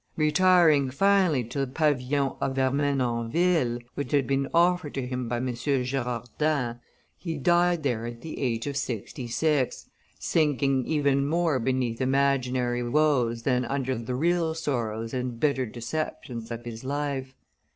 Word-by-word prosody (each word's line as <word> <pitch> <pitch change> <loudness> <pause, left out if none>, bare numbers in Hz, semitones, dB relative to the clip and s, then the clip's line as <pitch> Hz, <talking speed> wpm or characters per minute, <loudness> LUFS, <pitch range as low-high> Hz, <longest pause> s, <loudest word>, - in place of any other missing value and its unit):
Retiring, 155 -2 +4
finally, 185 -2 +3
to 120 +5 -5
the 135 - 0
pavilion 140 -2 +1
of 135 0 -1
Ermenonville, 135 +1 +1 0.2
which 145 +1 -4
had 140 -2 +3
been 135 +2 0
offered 175 -2 +2
to 135 -2 -2
him 125 -1 -3
by 120 - -1
M. 125 - -2
de 130 +2 0
Girardin, 125 +1 -2 0.4
he 165 -4 -5
died 175 +2 +2
there 120 -4 -1
at 120 0 -8
the 160 - -7
age 115 -4 -1
of 140 -1 -3
sixty 125 -2 -4
six, 145 +1 0 0.3
sinking 135 +1 +1
even 140 -2 +2
more 165 -3 +1
beneath 125 -1 -1
imaginary 130 -2 +1
woes 120 -3 +1
than 125 -1 +1
under 130 0 -1
the 115 +2 -4
real 165 +2 +1
sorrows 115 -7 -3
and 125 -2 -3
bitter 135 -3 +1
deceptions 120 -1 -5
of 120 0 -6
his 115 0 -7
life. 135 -1 -3
135 Hz, 145 wpm, -26 LUFS, 120-150 Hz, 0.4 s, Retiring